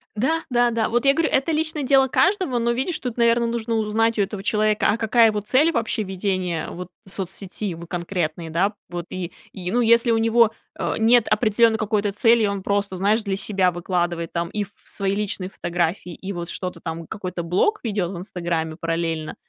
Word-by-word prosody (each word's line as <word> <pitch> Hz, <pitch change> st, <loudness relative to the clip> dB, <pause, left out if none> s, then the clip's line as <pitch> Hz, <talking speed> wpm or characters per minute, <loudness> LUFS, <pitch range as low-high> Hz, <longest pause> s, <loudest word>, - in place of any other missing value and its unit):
Да-да-да, 240 Hz, -3 st, +1 dB
вот 240 Hz, +4 st, 0 dB
я 275 Hz, -, +6 dB
говорю, 320 Hz, +2 st, +1 dB
это 275 Hz, +5 st, +1 dB
личное 310 Hz, -1 st, -1 dB
дело 270 Hz, 0 st, +4 dB
каждого, 360 Hz, -, +2 dB
но, 235 Hz, +1 st, +1 dB
видишь, 265 Hz, +8 st, -1 dB
тут, 250 Hz, -3 st, -4 dB
наверное, 235 Hz, 0 st, +3 dB
нужно 230 Hz, 0 st, -2 dB
узнать 225 Hz, +1 st, +1 dB
у -, -, +5 dB
этого 195 Hz, 0 st, -3 dB
человека: 215 Hz, 0 st, +2 dB
а 215 Hz, -, +2 dB
какая 225 Hz, +1 st, +4 dB
его 210 Hz, -1 st, 0 dB
цель 265 Hz, +10 st, +3 dB
вообще 230 Hz, -5 st, -1 dB
ведения 185 Hz, -4 st, -2 dB
вот 180 Hz, 0 st, -7 dB, 0.2 s
соцсети, 190 Hz, 0 st, -4 dB
в 170 Hz, +1 st, -9 dB
конкретной, 170 Hz, -2 st, -3 dB
да? 190 Hz, +6 st, +1 dB, 0.2 s
Вот. 175 Hz, -1 st, -5 dB
И 180 Hz, -2 st, -5 dB, 0.2 s
и, 180 Hz, -1 st, -5 dB
ну, 245 Hz, -, +2 dB
если 235 Hz, 0 st, +4 dB
у 225 Hz, -, +3 dB
него, 225 Hz, 0 st, +4 dB, 0.3 s
э, -, -, -1 dB
нет 230 Hz, +1 st, +4 dB
определённой 220 Hz, +1 st, +3 dB
какой-то 210 Hz, -1 st, 0 dB
цели, 230 Hz, +2 st, +4 dB
и 210 Hz, -, +3 dB
он 200 Hz, -1 st, -2 dB
просто, 200 Hz, -1 st, -1 dB
знаешь, 210 Hz, +4 st, +2 dB
для 195 Hz, -2 st, -2 dB
себя 190 Hz, -3 st, +1 dB
выкладывает 175 Hz, -1 st, -2 dB
там 170 Hz, 0 st, -1 dB
и 210 Hz, -, -2 dB
ф 200 Hz, -, -11 dB, 0.2 s
свои 195 Hz, -1 st, -2 dB
личные 200 Hz, -2 st, -2 dB
фотографии, 175 Hz, 0 st, -2 dB
и 195 Hz, +4 st, -6 dB
вот 175 Hz, -1 st, -5 dB
что-то 180 Hz, -1 st, -5 dB
там, 165 Hz, 0 st, -5 dB
какой-то 185 Hz, -4 st, -5 dB
блог 185 Hz, -, +1 dB
ведёт 200 Hz, -6 st, -1 dB
в 185 Hz, -, -6 dB
"Инстаграме" 170 Hz, -3 st, -3 dB
параллельно, 165 Hz, -1 st, -2 dB
205 Hz, 195 wpm, -23 LUFS, 180-230 Hz, 0.3 s, я